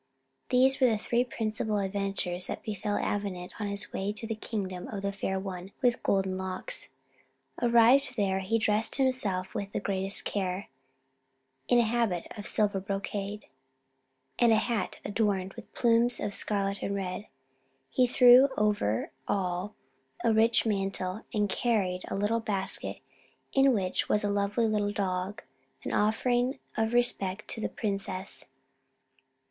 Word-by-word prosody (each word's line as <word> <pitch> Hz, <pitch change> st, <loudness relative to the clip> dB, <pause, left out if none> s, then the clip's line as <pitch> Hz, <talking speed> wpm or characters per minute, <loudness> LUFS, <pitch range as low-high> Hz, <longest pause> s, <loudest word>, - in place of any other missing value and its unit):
These 260 Hz, +2 st, +4 dB
were 255 Hz, -, +7 dB
the 220 Hz, -, +1 dB
three 235 Hz, +3 st, +1 dB
principal 220 Hz, -3 st, -2 dB
adventures 195 Hz, -2 st, -2 dB
that -, -, -5 dB
befell 205 Hz, -1 st, -2 dB
Avenant 195 Hz, -3 st, -3 dB
on 205 Hz, -, -1 dB
his 200 Hz, +1 st, -2 dB
way 195 Hz, +2 st, -1 dB
to 215 Hz, -, -1 dB
the 225 Hz, -, -2 dB
kingdom 195 Hz, -5 st, -4 dB
of 200 Hz, -2 st, -5 dB
the 200 Hz, -, 0 dB
Fair 190 Hz, -1 st, -2 dB
One 190 Hz, 0 st, -6 dB
with 245 Hz, -1 st, +3 dB
Golden 190 Hz, -1 st, 0 dB
Locks. 190 Hz, -, -2 dB, 0.7 s
Arrived 245 Hz, +3 st, +5 dB
there, 195 Hz, -2 st, +1 dB
he 195 Hz, +4 st, 0 dB
dressed 215 Hz, 0 st, +1 dB
himself 220 Hz, -9 st, 0 dB
with 200 Hz, 0 st, -4 dB
the -, -, 0 dB
greatest 195 Hz, 0 st, 0 dB
care, 190 Hz, -1 st, -2 dB, 1.0 s
in 245 Hz, -, +4 dB
a 240 Hz, -, +5 dB
habit 225 Hz, -6 st, 0 dB
of 205 Hz, -2 st, -6 dB
silver 205 Hz, -2 st, +2 dB
brocade, 200 Hz, +1 st, -4 dB, 0.9 s
and 235 Hz, -1 st, +5 dB
a -, -, +6 dB
hat 220 Hz, -2 st, -1 dB
adorned 200 Hz, -3 st, 0 dB
with -, -, -12 dB
plumes 235 Hz, 0 st, +3 dB
of 205 Hz, -, -3 dB
scarlet 200 Hz, -1 st, 0 dB
and 200 Hz, -, -2 dB
white. 195 Hz, +1 st, -4 dB, 0.6 s
He 255 Hz, -2 st, +3 dB
threw 250 Hz, +2 st, +7 dB
over 205 Hz, -, +1 dB, 0.2 s
all 185 Hz, +1 st, -1 dB, 0.5 s
a 230 Hz, -, +3 dB
rich 225 Hz, +1 st, +4 dB
mantle, 195 Hz, -1 st, -2 dB
and 210 Hz, -3 st, +1 dB
carried 195 Hz, -5 st, 0 dB
a -, -, -3 dB
little 210 Hz, +3 st, +1 dB
basket, 200 Hz, -4 st, -2 dB, 0.5 s
in 270 Hz, 0 st, +5 dB
which 190 Hz, -6 st, 0 dB
was 210 Hz, -, +2 dB
a 205 Hz, -, +1 dB
lovely 200 Hz, +3 st, +1 dB
little 210 Hz, -2 st, +1 dB
dog, 195 Hz, +2 st, -2 dB, 0.4 s
an -, -, -3 dB
offering 245 Hz, +5 st, +1 dB, 0.2 s
of 225 Hz, +1 st, 0 dB
respect 210 Hz, -5 st, 0 dB
to 220 Hz, -, -4 dB
the -, -, -1 dB
princess. 195 Hz, -3 st, -4 dB
205 Hz, 150 wpm, -29 LUFS, 195-230 Hz, 1.0 s, were